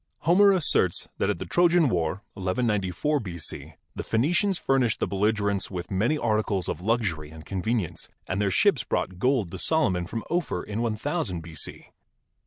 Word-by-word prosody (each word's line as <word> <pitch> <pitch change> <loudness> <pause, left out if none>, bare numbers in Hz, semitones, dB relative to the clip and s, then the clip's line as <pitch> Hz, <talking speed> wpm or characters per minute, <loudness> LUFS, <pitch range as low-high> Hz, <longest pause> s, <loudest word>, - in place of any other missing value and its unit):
Homer 195 +5 +5
asserts 150 - +2
that - - +1
at - - 0
the - - -5
Trojan 175 -2 +4
War, 90 -1 -1
1194 100 - 0
B.C., 85 - -7 0.2
the - - -3
Phenicians 170 - +1
furnished 130 -7 +1
the - - +1
belligerents 100 0 0
with 90 -1 -6
many 110 +11 +1
articles 105 - 0
of 80 - -3
luxury 95 -8 -1
and 80 0 -12
convenience, 100 0 -2 0.2
and 95 +3 -1
their 100 - +2
ships 90 - +3
brought 90 -1 -2
gold 125 -6 +1
to 95 - -6
Solomon 95 - +2
from 115 +3 -4
Ophir 170 - -1
in 105 +1 -4
IOOO 115 - -1
B.C. 80 -1 -8
105 Hz, 160 wpm, -26 LUFS, 90-135 Hz, 0.2 s, Homer